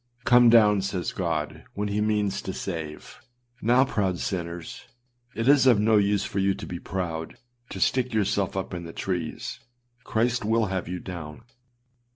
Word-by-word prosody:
âCome 120 -1 +7
down,â 105 -4 +6
says 95 -2 -2
God, - - -3
when 105 +1 -1
he 105 +1 0
means 105 -2 0
to 95 - -5
save. 80 -6 -6 0.4
Now, 125 +4 +4
proud 100 -9 -1
sinners, 85 -2 -5 0.5
it 115 +2 -2
is 140 -1 +6
of 120 -5 +6
no 110 +1 +4
use 100 0 +2
for 100 - -3
you 95 0 +2
to - - -7
be 85 - -6
proud, 85 -4 -4 0.3
to - - -6
stick 125 -1 +1
yourselves 100 -3 0
up 95 -1 -3
in 85 -1 -5
the 85 -1 -8
trees; 90 -4 -4 0.4
Christ 120 +1 0
will 110 +1 +2
have 95 -3 -2
you 90 +1 -4
down. 85 0 -8
100 Hz, 170 wpm, -26 LUFS, 90-110 Hz, 0.5 s, âCome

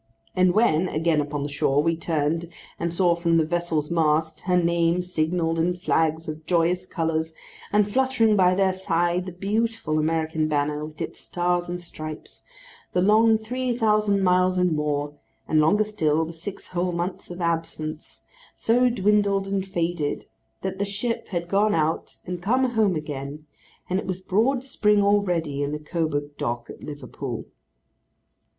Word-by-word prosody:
And 185 -1 +3
when, 185 -6 +3
again 160 -1 +1
upon 145 0 -3
the - - -2
shore, 145 0 +1
we 165 0 +2
turned 165 0 -1 0.3
and 170 0 -1
saw 175 0 +3
from 170 -1 +2
the 160 - +3
vessel's 165 -2 -1
mast 160 -1 +1
her 180 -1 +3
name 170 0 +2
signalled 165 -1 0
in 175 +2 +1
flags 160 -2 0
of 155 0 -7
joyous 180 +1 +1
colours, 160 -1 -2 0.4
and 210 0 +3
fluttering 240 -1 +2
by 185 -2 +4
their 190 0 +2
side 175 0 0
the - - -4
beautiful 200 -3 -1
American 160 0 0
banner 150 0 0
with 155 -1 -14
its - - -5
stars 175 0 -1
and 175 0 -3
stripes,—the 460 - -8
long 220 +4 +5
three 245 +2 -2
thousand 210 -3 +2
miles 185 0 +3
and 180 -1 +3
more, 145 -1 -1 0.3
and, 155 - +3
longer 205 +8 +4
still, 160 -7 0
the 165 - -7
six 180 +5 -7
whole 180 0 -1
months 175 +2 -4
of 175 0 -7
absence, 165 -2 -3 0.3
so 245 +2 +3
dwindled 205 -3 +2
and 195 -1 -2
faded, 170 -5 -2 0.4
that 190 0 -3
the - - +1
ship 210 +4 -2
had 175 -3 -3
gone 205 +2 +2
out 160 0 -1
and 180 -1 -5
come 250 +8 +2
home 215 -6 +2
again, 150 0 -5 0.4
and 185 +1 0
it - - -6
was 185 -1 -2
broad 225 +8 +1
spring 210 -6 +2
already 175 -8 +1
in 145 0 -1
the 150 - -2
Coburg 150 -2 -2
Dock 120 0 -3
at - - -13
Liverpool. 145 -4 -6
175 Hz, 160 wpm, -24 LUFS, 155-200 Hz, 0.4 s, long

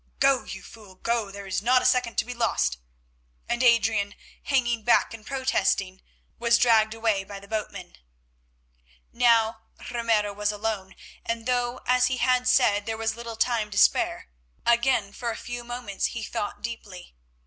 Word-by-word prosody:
Go, 275 -1 +3
you - - -8
fool, 210 -4 -14
go, 230 +1 -1
there 200 0 -9
is 190 0 -2
not 250 +3 +3
a - - -3
second 250 -2 +2
to - - +2
be 245 - -6
lost," 65 - 0 0.7
and 240 - -1
Adrian, 225 -4 +3 0.3
hanging 240 -5 0
back 240 - +3
and 225 -1 -10
protesting, 200 -8 -1 0.4
was 235 0 +4
dragged 225 -2 +4
away 220 -3 0
by 200 +1 -9
the 200 - -15
boatmen. 200 -4 -5 1.2
Now 230 -2 +3 0.3
Ramiro 225 -4 +1
was 205 +1 -1
alone, 210 -2 -4 0.3
and 230 -1 -3
though, 245 0 -1
as 250 0 +3
he 255 - -1
had 250 0 +2
said, 230 -5 +3
there 225 0 -2
was 225 0 -1
little 235 -1 -7
time 225 -2 0
to 200 - -7
spare, - - +3 0.4
again 235 -4 +2
for 240 +2 -4
a 225 - -4
few 245 0 -6
moments 240 -5 -4
he 230 - -6
thought 205 - -4
deeply. 210 - -7
225 Hz, 165 wpm, -26 LUFS, 205-240 Hz, 1.2 s, was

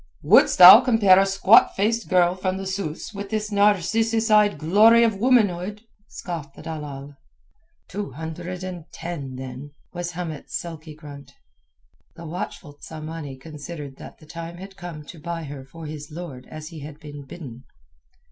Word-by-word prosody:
"Wouldst - - +5
thou 185 +6 +11
compare 225 -7 +5
a 195 - +3
squat 195 +3 +5
faced 225 +3 0
girl 180 -1 +4
from 185 0 -2
the 195 - -6
Sus 190 0 -5
with 200 0 -6
this 215 0 -3
narcissus 215 +3 +2
eyed 210 -1 +4
glory 215 +8 +5
of 220 -4 +1
womanhood?" 210 -4 +1 0.2
scoffed 160 -6 -7
the - - -12
dalal. 145 -3 -7 0.7
"Two 205 +1 -5
hundred 170 +4 -6
and 180 -3 -8
ten, 160 -6 -6
then," 130 +2 -8 0.2
was 175 0 -5
Hamet's 165 -4 -5
sulky 160 -2 -9
grunt. 145 -3 -12 0.8
The 170 - -10
watchful 160 -2 -6
Tsamanni 155 -2 -8
considered 145 -1 -9
that - - -12
the 155 - -17
time 165 +2 -8
had 195 +2 -11
come 175 -5 -9
to 165 - -11
buy 170 +1 -5
her 140 -2 -8
for 160 +4 -11
his 150 -1 -8
lord 150 -6 -9
as 155 0 -8
he 165 -3 -10
had 145 +1 -10
been 145 -1 -10
bidden. 135 -4 -11
170 Hz, 160 wpm, -23 LUFS, 150-195 Hz, 0.8 s, thou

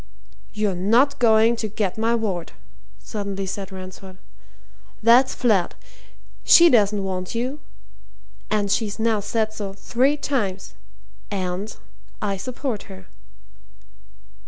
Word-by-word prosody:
"You're 210 -2 -1
not 230 +10 +2
going 225 -1 +5
to 220 - -2
get 205 -2 -2
my 225 +1 +1
ward," 195 -7 -3 0.4
suddenly 200 -2 -5
said 195 +1 -5
Ransford. 185 0 -10 0.9
"That's 245 +4 +5
flat! 210 -8 +1 0.7
She 340 -1 +7
doesn't 210 -3 +3
want 185 +1 -4
you 255 +5 -2 0.9
and 205 -2 0
she's 210 -1 0
now 220 -1 +1
said 215 +1 -1
so 205 -3 -5
three 255 +8 +1
times. 210 -10 -2 0.6
And 190 +2 -4 0.4
I 200 -1 -1
support 240 +2 -5
her." 95 0 -11
210 Hz, 110 wpm, -23 LUFS, 195-230 Hz, 0.9 s, She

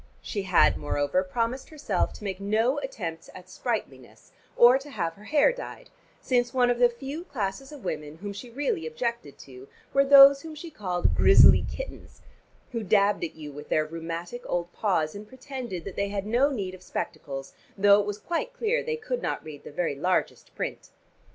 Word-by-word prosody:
She 205 - -3
had, 185 -2 +4
moreover, 145 +5 0
promised 230 +6 -2
herself 310 -3 -1
to - - -12
make 195 -2 -4
no 220 +7 +1
attempts 170 -12 -6
at 185 0 -11
sprightliness 130 - -5 0.3
or 245 +2 +7
to 285 +2 -12
have 165 -11 -2
her 205 +4 -16
hair 300 - +4
dyed, - - -9 0.3
since 245 0 0
one 245 -1 +4
of 240 - -1
the 245 -1 +6
few 270 +7 -7
classes 235 - -4
of 290 -4 -11
women 150 -2 -4
whom 200 +3 -6
she 240 +5 -9
really 235 - -2
objected 160 - -4
to 130 0 -13 0.3
were 275 - +5
those 275 0 +8
whom 315 0 -9
she 325 +2 -9
called 180 -8 -1
grizzly - - +7
kittens, - - -9 0.5
who 230 -2 -3
dabbed 200 -1 +2
at 165 - -4
you 150 -2 -8
with 145 +1 -10
their 155 - +2
rheumatic 165 +7 -6
old 175 0 -2
paws, 165 -7 0
and 205 +1 -9
pretended 255 - -7
that 195 - -7
they 200 0 -1
had 200 -1 -3
no 240 +6 +3
need 200 -9 -4
of 185 - -11
spectacles, 135 -5 -6 0.2
though 200 +1 +6
it 205 - -5
was 205 0 -3
quite 345 - -3
clear 480 0 0
they 470 0 -2
could 485 +2 -4
not - - -3
read 155 -2 -10
the - - -10
very 165 +1 -1
largest 180 +7 -1
print. - - -5
205 Hz, 190 wpm, -27 LUFS, 170-265 Hz, 0.5 s, those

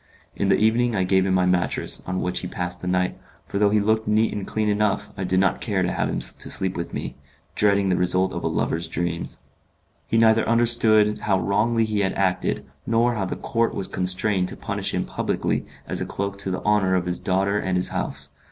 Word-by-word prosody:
In - - 0
the - - +4
evening 115 +2 +2
I 95 - +1
gave 95 +1 +2
him 95 - +2
my 90 -1 +3
mattress, 90 -4 0
on 95 0 -2
which 90 0 -1
he - - -5
passed 90 0 -5
the 90 - -5
night, 90 0 0 0.3
for 100 - -3
though 105 -1 +4
he 105 +1 +3
looked 110 +1 +1
neat 110 +1 +2
and 100 -2 -5
clean 110 -1 -1
enough 105 -1 0
I 95 - -4
did 95 0 +1
not 95 -1 +1
care 100 -4 0
to 90 - 0
have - - -1
him - - -2
to - - 0
sleep 95 -1 +2
with 85 - -4
me, - - -5 0.4
dreading 100 -2 +2
the 90 - +2
results 90 +1 +1
of - - -5
a - - 0
lover's 85 +1 -1
dreams. 85 -1 -4 0.7
He 115 - +1
neither 110 0 +4
understood 115 -2 +4
how 95 -3 +1
wrongly 110 +5 +1
he 105 -1 -1
had 95 -1 +1
acted, 95 -2 -1 0.2
nor 115 +1 +2
how 105 -4 -2
the - - -4
count 115 0 -1
was 95 - +1
constrained 95 +1 0
to - - -5
punish - - -3
him - - -1
publicly - - -2 0.2
as - - -2
a - - -3
cloak 100 0 -3
to 95 - -2
the 95 - -3
honour 105 -3 +2
of 90 -1 0
his 90 0 -1
daughter 100 +2 0
and 95 -2 -1
his 90 - +1
house. - - -3
100 Hz, 225 wpm, -23 LUFS, 90-110 Hz, 0.7 s, the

